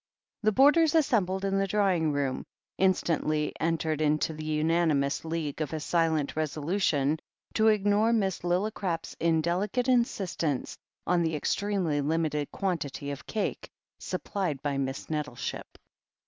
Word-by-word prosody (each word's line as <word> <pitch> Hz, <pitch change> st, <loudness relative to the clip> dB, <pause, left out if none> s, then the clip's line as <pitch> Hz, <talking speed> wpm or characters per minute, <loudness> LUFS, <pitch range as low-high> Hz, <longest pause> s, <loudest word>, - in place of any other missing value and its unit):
The 215 Hz, 0 st, +3 dB
boarders 295 Hz, +7 st, +5 dB
assembled 200 Hz, -, +2 dB
in 195 Hz, 0 st, +1 dB
the 195 Hz, -, +1 dB
drawing 190 Hz, -6 st, +2 dB
room 140 Hz, -2 st, -1 dB, 0.3 s
in 190 Hz, 0 st, +4 dB
stantly 155 Hz, -3 st, -1 dB
entered 160 Hz, -1 st, 0 dB
into 155 Hz, +1 st, +1 dB
the 155 Hz, 0 st, -7 dB
unanimous 155 Hz, -2 st, +1 dB
league 160 Hz, -2 st, -3 dB
of 155 Hz, -, -3 dB
a 160 Hz, -, -2 dB
silent 160 Hz, -2 st, 0 dB
resolution 155 Hz, -1 st, 0 dB, 0.3 s
to 220 Hz, 0 st, +3 dB
ignore 210 Hz, +1 st, +3 dB
Miss 195 Hz, -5 st, +1 dB
Lillicrap's 180 Hz, -1 st, -2 dB
indelicate 175 Hz, +9 st, +1 dB
insist 235 Hz, -7 st, +1 dB
ence 145 Hz, -6 st, -1 dB, 0.3 s
on 175 Hz, -1 st, +2 dB
the 160 Hz, -1 st, 0 dB
extremely 180 Hz, -2 st, 0 dB
limited 150 Hz, -1 st, -1 dB
quantity 150 Hz, -7 st, -3 dB
of 140 Hz, -, -8 dB
cake 215 Hz, -, -3 dB, 0.3 s
supplied 175 Hz, -9 st, -3 dB
by 145 Hz, -1 st, -1 dB
Miss 135 Hz, 0 st, -3 dB
Nettleship. 150 Hz, -5 st, -4 dB
165 Hz, 135 wpm, -28 LUFS, 150-195 Hz, 0.3 s, boarders